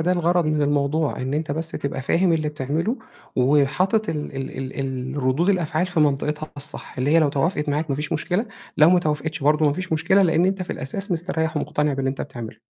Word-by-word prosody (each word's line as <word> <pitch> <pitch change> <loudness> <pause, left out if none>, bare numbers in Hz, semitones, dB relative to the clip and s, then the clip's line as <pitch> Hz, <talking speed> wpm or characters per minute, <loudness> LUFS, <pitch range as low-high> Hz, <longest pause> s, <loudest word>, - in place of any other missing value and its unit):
ده 180 +3 +2
الغَرَض 175 -1 +2
من 155 -1 +1
الموضوع. 145 +1 +1
إن 130 +2 -2
أنت 155 0 -2
بس 160 +2 -3
تبقى 140 -1 -4
فاهم 170 +5 +2
اللي 155 -2 +1
بتعمله، 155 - -2 0.4
وحاطط 150 - +2
ال 150 -3 -3
ال 135 0 -4
الردود 140 +7 +1
الأفعال 175 -2 0
في 175 -3 -1
منطقتها 150 +1 0
الصح. 145 -2 -2
اللي 135 +3 +1
هي 165 - +6
لو 155 -3 +4
توافقت 150 +2 0
معاك 150 +1 -1
ما 135 - 0
فيش 150 0 -3
مشكلة، 180 +8 0 0.3
لو 155 +3 +7
ما 180 - +5
توافقتش 155 -1 -2
برضه 150 +1 +3
ما 145 - +3
فيش 185 +1 -4
مشكلة، 185 +5 +3
لإن 170 0 +3
أنت 190 -1 0
في - - -6
الأساس 195 +9 -3
مستريّح، 160 -2 -1
ومُقتنع 150 -1 0
باللي 135 -1 -1
أنت 135 - -6
بتعمله. 120 -5 -7
150 Hz, 205 wpm, -23 LUFS, 140-170 Hz, 0.4 s, لو